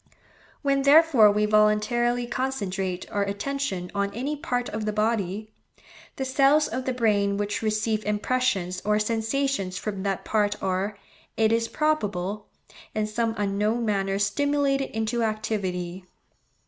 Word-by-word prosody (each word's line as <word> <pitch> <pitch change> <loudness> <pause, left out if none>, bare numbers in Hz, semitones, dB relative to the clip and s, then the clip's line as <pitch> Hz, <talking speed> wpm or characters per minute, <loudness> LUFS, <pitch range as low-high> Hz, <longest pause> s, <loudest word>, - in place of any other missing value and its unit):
When 275 -1 +2
therefore 280 -6 +6
we 210 +1 +2
voluntarily 215 +3 +2
concentrate 200 -7 -3
our 205 - 0
attention 200 -1 -3
on 200 0 -1
any 275 +6 -2
part 245 -4 -2
of 215 0 -4
the 215 - 0
body, 215 -1 -1 0.6
the 265 - -3
cells 275 +3 +4
of 255 0 -4
the 260 - 0
brain 205 -5 +1
which 205 0 -2
receive 215 0 0
impressions 205 -4 0
or 210 0 +2
sensations 225 -2 -1
from 200 -1 -4
that 195 -1 -2
part 205 -1 +1
are, 195 +2 -2 0.4
it 220 0 +3
is 230 0 +1
probable, 210 - -1 0.5
in 215 0 +1
some 225 +1 -1
unknown 210 +3 0
manner 195 -2 0
stimulated 275 +6 +1
into 220 +2 -2
activity. 190 -5 -2
215 Hz, 135 wpm, -25 LUFS, 200-245 Hz, 0.6 s, therefore